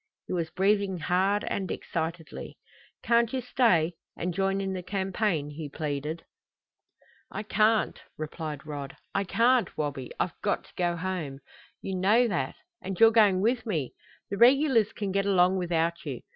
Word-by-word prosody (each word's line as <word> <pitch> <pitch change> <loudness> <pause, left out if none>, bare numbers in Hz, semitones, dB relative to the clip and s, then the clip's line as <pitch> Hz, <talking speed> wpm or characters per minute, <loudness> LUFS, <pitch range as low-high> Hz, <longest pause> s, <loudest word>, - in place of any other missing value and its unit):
He - - -5
was 170 -3 -1
breathing 195 0 +1
hard 190 +5 +1
and 195 -2 -2
excitedly. 165 -1 -5 0.5
"Can't 235 -1 +3
you 265 - -1
stay 225 -10 +2 0.2
and 180 +1 -2
join 195 +2 0
in 195 -1 -2
the 185 - -3
campaign?" 190 -5 -1
he 150 0 -6
pleaded. 150 +2 -4 1.0
"I 210 - -5
can't," 215 +1 +2 0.2
replied 155 -2 -5
Rod. 140 -2 -6 0.2
"I 195 - +1
can't, 240 +4 +2
Wabi; 145 -4 -3
I've 175 - -2
got 205 - 0
to - - -20
go 175 -1 0
home. 170 -6 -3 0.5
You 190 - -3
know 215 +7 +4
that. 135 -9 -2 0.3
And 190 -1 -5
you're 225 0 +8
going 205 -5 +5
with 240 +3 +1
me. 155 - -2 0.4
The 200 - -2
regulars 245 -2 +5
can 200 -2 -3
get 195 +1 0
along 185 -1 +4
without 170 -1 0
you. 135 -6 -5
185 Hz, 160 wpm, -28 LUFS, 160-210 Hz, 1.0 s, you're